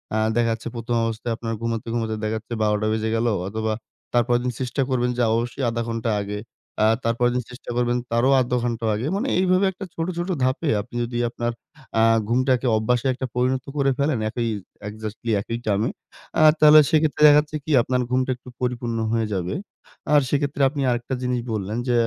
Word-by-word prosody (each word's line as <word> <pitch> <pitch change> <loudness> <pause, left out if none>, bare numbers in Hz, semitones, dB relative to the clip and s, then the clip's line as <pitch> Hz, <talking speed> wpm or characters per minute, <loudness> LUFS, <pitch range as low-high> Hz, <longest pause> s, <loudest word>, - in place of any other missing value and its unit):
আ - - +2 0.2
দেখা 120 -1 +2
যাচ্ছে 115 - -6
১ম 120 +1 -2
অবস্থায় 115 +1 -2
আপনার 115 -1 -4
ঘুমাতে, 115 -1 -3
ঘুমাতে 110 -2 -1
দেখা 110 0 -1
যাচ্ছে 115 +2 -8
১২ 105 -1 +3
টা 110 - 0
বেজে 110 0 -1
গেলো 115 0 +1 0.2
অথবা, 110 +2 -2 0.4
তারপরের 120 0 +2
দিন 125 - 0
চেষ্টা 130 +2 -1
করবেন 125 -1 +1
যে 125 - +2
অবশ্যই 120 +4 -2
১/২ 115 0 -2
ঘন্টা 115 0 -2
আগে, 105 +1 -4 0.4
আ - - +6 0.2
তার 115 - +2
পরেরদিন 125 0 +2
চেষ্টা 125 - -11
করবেন 120 0 +1
তারও 120 +3 +3
১/২ 125 0 -1
ঘন্টা 115 -1 -2
আগে। 115 +6 -2
মানে 240 +7 -1
এইভাবে 185 +1 +3
একটা 195 +2 -8
ছোট, 165 - -2
ছোট 175 +2 -2
ধাপে 130 +5 0
আপনি 120 +3 -13
যদি 120 0 -4
আপনার 120 0 -2 0.5
আ - - +5 0.3
ঘুমটাকে 130 +1 +2
অভ্যাসে 120 +3 0
একটা 130 +1 -4
পরিণত 130 +1 +1
করে 140 -1 +3
ফেলেন 140 -1 +1
একি 120 +2 -3 0.5
এক্সেক্টলি 110 +2 -5
একই 115 +3 -4
টাইমে, 105 0 +1 0.5
আ - - +5 0.2
তাহলে 155 0 +9
সেক্ষেত্রে 155 -1 +2
দেখা 145 0 +8
যাচ্ছে 150 0 -6
কি? 155 - -4
আপনার 125 +1 0
ঘুমটা 130 0 +1
একটু 125 +1 -14
পরিপূর্ণ 120 -2 -2
হয়ে 115 -1 +1
যাবে। 90 +2 -2 0.6
আর 145 - +7
সেক্ষেত্রে 145 0 0
আপনি 140 0 -4
আরেকটা 120 +2 -2
জিনিস 125 0 0
বললেন 105 +1 -3
যে, 120 - +2
120 Hz, 195 wpm, -23 LUFS, 115-130 Hz, 0.6 s, তাহলে